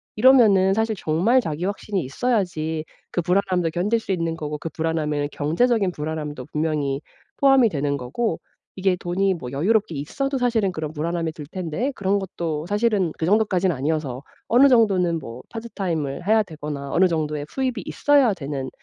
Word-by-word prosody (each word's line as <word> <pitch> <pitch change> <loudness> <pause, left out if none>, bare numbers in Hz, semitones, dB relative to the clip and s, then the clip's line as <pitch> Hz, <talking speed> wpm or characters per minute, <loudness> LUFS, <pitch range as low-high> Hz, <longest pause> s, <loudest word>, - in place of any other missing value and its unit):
이러면은 215 -6 +6
사실 220 +1 0
정말 180 +11 +2
자기 160 -5 -4
확신이 200 -1 -2
있어야지 160 - -1 0.3
그 175 - 0
불안함도 180 -1 +1
견딜 205 +7 +1
수 200 - -5
있는 165 -3 -1
거고 150 -2 -4
그 165 - -5
불안함에 155 -2 -1
경제적인 195 +7 +1
불안함도 150 -4 -5
분명히 150 -3 -1 0.4
포함이 270 -4 +5
되는 145 -4 -1
거고 160 - -2 0.4
이게 190 -1 +1
돈이 185 +3 0
뭐 125 -7 -7
여유롭게 180 +5 +1
있어도 270 - -2
사실은 230 -6 +1
그런 155 -2 -4
불안함이 165 +1 -2
들 155 -3 -9
텐데 185 - -3
그런 200 +1 +1
것도 165 -5 -4
사실은 205 -4 +1
그 160 - -1
정도까진 190 -2 +2
아니어서 140 -2 -2 0.3
어느 255 +4 +6
정도는 195 -9 +3
뭐 125 -3 -9
파트타임을 180 -9 -4
해야 220 0 +4
되거나 150 -5 -6
어느 185 +1 +4
정도의 150 -3 -2
수입이 255 -6 -2
있어야 280 -7 +3
되는 135 -5 -5
175 Hz, 385 characters per minute, -23 LUFS, 150-210 Hz, 0.4 s, 이러면은